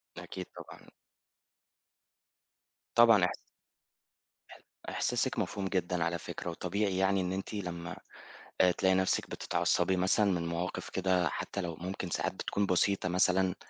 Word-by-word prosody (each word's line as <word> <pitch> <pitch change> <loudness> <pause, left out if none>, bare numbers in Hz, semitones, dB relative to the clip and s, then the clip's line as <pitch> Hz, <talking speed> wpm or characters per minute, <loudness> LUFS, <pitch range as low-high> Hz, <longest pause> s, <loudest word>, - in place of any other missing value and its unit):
ده - - -7
أكيد - - -6
طبعًا. - - -11 2.1
طبعًا 115 -5 +7
احس - - -3 1.1
إح - - -13 0.3
إحساسِك - - 0
مفهوم 100 -1 -2
جدًا 90 -2 0
على 85 +1 -1
فكرة، 85 - -6
وطبيعي 95 +3 -1
يعني 95 0 +2
إن 90 - -2
أنتِ 95 +3 -4
لمّا 90 -4 -4 0.7
آآ 90 - +6
تلاقي 95 +1 +2
نفسِك 95 0 +1
بتتعصبي 95 - +1
مثلًا 95 +3 +3
من 85 -2 -1
مواقِف 85 +2 -3
كده 90 -3 +1
حتّى 100 - -4
لو 85 -3 -4
ممكن 90 +2 -5
ساعات - - -1
بتكون 100 - -1
بسيطة 95 0 +1
مثلًا، 90 +1 +2
95 Hz, 135 wpm, -31 LUFS, 90-95 Hz, 2.1 s, طبعًا